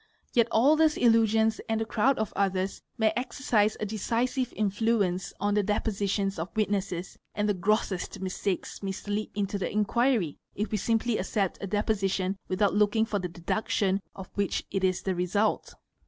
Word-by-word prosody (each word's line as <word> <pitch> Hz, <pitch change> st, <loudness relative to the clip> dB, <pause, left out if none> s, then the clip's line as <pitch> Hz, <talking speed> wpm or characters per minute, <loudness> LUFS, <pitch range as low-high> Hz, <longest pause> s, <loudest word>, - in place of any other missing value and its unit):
Yet 235 Hz, -2 st, +4 dB
all 260 Hz, +7 st, +5 dB
these 315 Hz, -1 st, +3 dB
illusions 225 Hz, -1 st, +3 dB
and 225 Hz, 0 st, +1 dB
a 225 Hz, -, -1 dB
crowd 240 Hz, +5 st, +2 dB
of 215 Hz, -1 st, -2 dB
others 190 Hz, -1 st, 0 dB, 0.2 s
may 220 Hz, -2 st, +3 dB
exercise 235 Hz, -4 st, +1 dB
a -, -, -1 dB
decisive 240 Hz, +4 st, -1 dB
influence 205 Hz, -3 st, 0 dB
on 205 Hz, 0 st, +1 dB
the 210 Hz, -, +3 dB
depositions 200 Hz, -2 st, -1 dB
of 165 Hz, +3 st, -3 dB
witnesses 200 Hz, -4 st, -1 dB, 0.2 s
and 210 Hz, +1 st, 0 dB
the 205 Hz, -, +3 dB
grossest 195 Hz, 0 st, -1 dB
mistakes 190 Hz, 0 st, -3 dB
may 195 Hz, -1 st, -2 dB
slip 205 Hz, +2 st, -3 dB
into 200 Hz, -1 st, -1 dB
the 190 Hz, -, -2 dB
inquiry 215 Hz, -, +1 dB, 0.2 s
if 210 Hz, +2 st, -2 dB
we 215 Hz, -, +1 dB
simply 225 Hz, +2 st, +1 dB
accept 195 Hz, 0 st, -1 dB
a 195 Hz, -, -3 dB
deposition 195 Hz, -2 st, 0 dB
without 195 Hz, +2 st, +1 dB
looking 210 Hz, +2 st, +3 dB
for 210 Hz, -2 st, -1 dB
the 180 Hz, -1 st, -3 dB
deductions 190 Hz, +3 st, 0 dB
of 190 Hz, -2 st, -9 dB
which 200 Hz, -2 st, -1 dB
it 195 Hz, -1 st, -1 dB
is 185 Hz, -1 st, +1 dB
the 190 Hz, -, 0 dB
result. 185 Hz, +4 st, 0 dB
205 Hz, 170 wpm, -28 LUFS, 195-220 Hz, 0.2 s, all